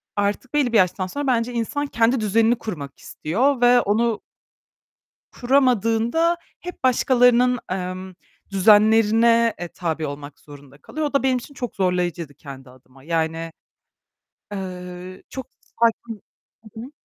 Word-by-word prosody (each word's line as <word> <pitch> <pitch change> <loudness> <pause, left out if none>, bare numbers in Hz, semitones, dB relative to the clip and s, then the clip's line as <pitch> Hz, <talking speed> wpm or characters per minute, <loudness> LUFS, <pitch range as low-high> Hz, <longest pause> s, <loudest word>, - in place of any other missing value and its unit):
artık 205 +6 -2
belli 265 -5 +1
bir - - +5
yaştan 185 0 +1
sonra 285 +8 -4
bence 240 -1 0
insan 280 +5 -2
kendi 230 +1 +1
düzenini 225 +3 +2
kurmak 145 -10 -7
istiyor 245 - -1
ve 245 0 +6
onu 225 +2 0 1.1
kuramadığında 250 - +2 0.2
hep 355 -6 -9
başkalarının, 250 -1 +3
emm, 185 0 -5 0.4
düzenlerine, 225 +3 +4
eee, 175 - -4
tabi 165 -2 -4
olmak 145 0 -9
zorunda 140 -2 -15
kalıyor. 310 - -5
O 290 - -8
da 275 - +2
benim 260 -1 +2
için 265 +4 -10
çok 245 -2 -6
zorlayıcıydı 175 -5 -1
kendi 135 -3 -12
adıma 130 +1 -20
yani, 165 +1 -2 1.0
eee, 180 -1 -7
çok 265 -2 -7
sakin 230 -2 -2 0.5
Hı 225 - -7
hı. 260 +4 -10
220 Hz, 130 wpm, -22 LUFS, 180-245 Hz, 1.1 s, ve